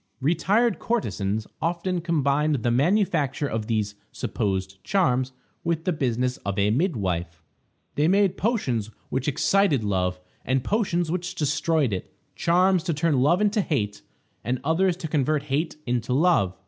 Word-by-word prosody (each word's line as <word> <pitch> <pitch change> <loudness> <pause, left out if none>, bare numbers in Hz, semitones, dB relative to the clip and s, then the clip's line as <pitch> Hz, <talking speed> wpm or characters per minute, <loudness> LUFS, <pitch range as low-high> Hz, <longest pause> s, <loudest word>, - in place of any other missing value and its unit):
Retired 195 - +2
courtesans 110 - -1 0.2
often 175 +1 -1
combined 150 -4 +1
the 120 - +2
manufacture 145 - +1
of 110 -4 -3
these 105 -3 -1 0.2
supposed 95 -1 -3
charms 130 -10 +1 0.3
with 165 -1 -1
the 180 - 0
business 125 -3 -1
of 100 0 -4
a 100 +1 +3
midwife. 95 - -1 0.5
They 150 +2 +2
made 195 +1 +3
potions 130 - -1 0.2
which 130 +1 -2
excited 150 - +2
love 90 -3 0 0.2
and 130 0 0
potions 175 -6 0
which 180 +1 -3
destroyed 150 - +1
it; 95 - -5 0.2
charms 180 +1 +3
to 170 -4 0
turn 150 -2 +2
love 170 +8 +3
into 210 +1 +2
hate, 105 - -2 0.4
and 125 +1 -1
others 170 +4 +2
to 165 - -5
convert 150 -1 +1
hate 150 +3 -1
into 125 0 -1
love. 130 - +2
145 Hz, 145 wpm, -25 LUFS, 115-175 Hz, 0.5 s, a